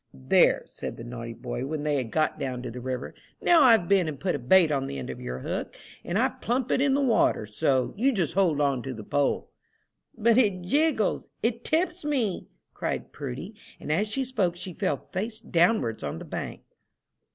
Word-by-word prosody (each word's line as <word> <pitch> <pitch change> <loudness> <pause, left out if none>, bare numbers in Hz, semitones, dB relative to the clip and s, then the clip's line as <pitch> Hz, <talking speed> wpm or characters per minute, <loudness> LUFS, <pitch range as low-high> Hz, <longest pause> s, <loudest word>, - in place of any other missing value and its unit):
"There," 65 0 +3
said - - -7
the 115 - -8
naughty 115 -1 -6
boy, 125 +3 -4
when 150 0 -3
they 150 -1 +1
had 125 -4 -2
got 155 +5 0
down 125 -2 -3
to 125 - -5
the 125 +2 -7
river, 130 0 -4 0.3
"now 340 -2 +5
I've 225 -9 +6
been 190 -3 +3
and 150 -3 -5
put 185 - 0
a 145 - -2
bait 160 +6 +5
on 135 -2 0
the 70 - -5
end 65 - -5
of - - -9
your 60 0 -4
hook, - - -4 0.3
and - - -2
I - - +3
plump 250 +2 -2
it - - +2
in 275 -1 +3
the 280 - +2
water 230 - +3
so. 125 +5 0
You 255 +7 +3
just 190 - -1
hold 175 -6 +2
on 140 -3 +1
to 130 +1 -5
the 110 - -8
pole." 145 +5 0 0.7
"But 230 +2 +4
it 200 -7 +2
jiggles 285 - +1
it 235 +1 0
tips 335 +2 0
me!" 260 -10 -1 0.3
cried - - -3
Prudy; - - -6 0.3
and - - -5
as 200 +8 +2
she 265 +5 -1
spoke 210 -9 0
she 180 +1 -7
fell 145 -3 -2
face 220 +3 -3
downwards 170 - +2
on 70 - -4
the - - -8
bank. - - -5
175 Hz, 210 wpm, -27 LUFS, -, 0.7 s, I've